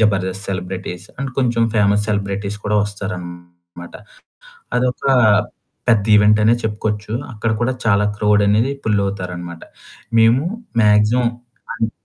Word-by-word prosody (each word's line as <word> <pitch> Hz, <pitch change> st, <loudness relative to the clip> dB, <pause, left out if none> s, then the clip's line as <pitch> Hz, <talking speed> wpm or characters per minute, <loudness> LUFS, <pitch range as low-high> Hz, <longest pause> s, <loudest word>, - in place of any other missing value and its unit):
Jabardasth 95 Hz, -2 st, 0 dB
celebrities 90 Hz, -1 st, -5 dB
and 135 Hz, 0 st, -3 dB
కొంచెం 120 Hz, -3 st, +1 dB
famous 105 Hz, -1 st, +3 dB
celebrities 100 Hz, -1 st, -2 dB
కూడా 105 Hz, 0 st, +1 dB
వస్తారనమాట. 85 Hz, -4 st, -8 dB, 0.8 s
అదొక 125 Hz, 0 st, -1 dB, 0.9 s
పెద్ద 110 Hz, -4 st, +4 dB
ఈవెంట్ 105 Hz, 0 st, +5 dB
అనే 115 Hz, +2 st, +5 dB
చెప్పుకోవచ్చు. 105 Hz, 0 st, -3 dB, 0.2 s
అక్కడ 115 Hz, +1 st, -2 dB
కూడా 120 Hz, +2 st, +1 dB
చాలా 105 Hz, -2 st, +3 dB
క్రౌడ్ 105 Hz, 0 st, +3 dB
అనేది 110 Hz, +6 st, +2 dB
పుల్ 105 Hz, -2 st, +1 dB
అవుతారన్నమాట. 90 Hz, -3 st, -6 dB, 0.6 s
మేము 115 Hz, +4 st, +5 dB, 0.4 s
మాక్సిమం 105 Hz, +3 st, +3 dB, 0.5 s
అండ్ 115 Hz, 0 st, -1 dB
105 Hz, 115 wpm, -19 LUFS, 95-110 Hz, 0.9 s, ఈవెంట్